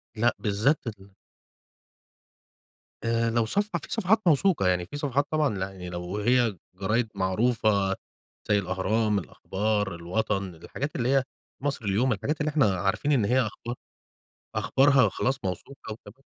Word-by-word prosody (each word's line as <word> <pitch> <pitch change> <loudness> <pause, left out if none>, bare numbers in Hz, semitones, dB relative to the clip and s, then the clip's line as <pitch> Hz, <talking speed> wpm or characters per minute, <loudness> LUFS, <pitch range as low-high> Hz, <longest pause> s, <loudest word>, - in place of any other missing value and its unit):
لأ، 120 +2 +3
بالذات 115 +7 +1
ال 100 -3 -8 1.9
آآ، 115 0 +1
لو 115 -1 +2
صفحة 205 - 0
في - - -10
صفحات 220 0 +3
موثوقة 155 - +4
يعني، 90 -1 +1
في 125 - -7
صفحات 140 -1 0
طبعًا 150 -7 +1
لأ، 95 +1 -2
يعني 90 -2 -8
لو 90 +3 -4
هي 120 -1 +2 0.2
جرايد 105 +5 0
معروفة 100 0 +2 0.5
زيّ 105 -1 +4
الأهرام، 105 +3 +1
الأخبار، 105 +2 -2
الوطن، 95 +1 -2
الحاجات 145 - -5
اللي 125 0 0
هي 135 -1 +4 0.4
المصري 135 -7 -2
اليوم، 125 +6 +2
الحاجات 110 +10 -2
اللي 150 - +1
إحنا 135 -11 +3
عارفين 105 +10 0
إن 125 -8 +3
هي 125 +5 +3
أخبار 120 +1 -4 0.8
أخبارها 135 -2 +4
وخلاص 130 +6 0
موثوقة 110 +6 -5
وتمام. 130 +4 -13
110 Hz, 145 wpm, -27 LUFS, 95-135 Hz, 1.9 s, موثوقة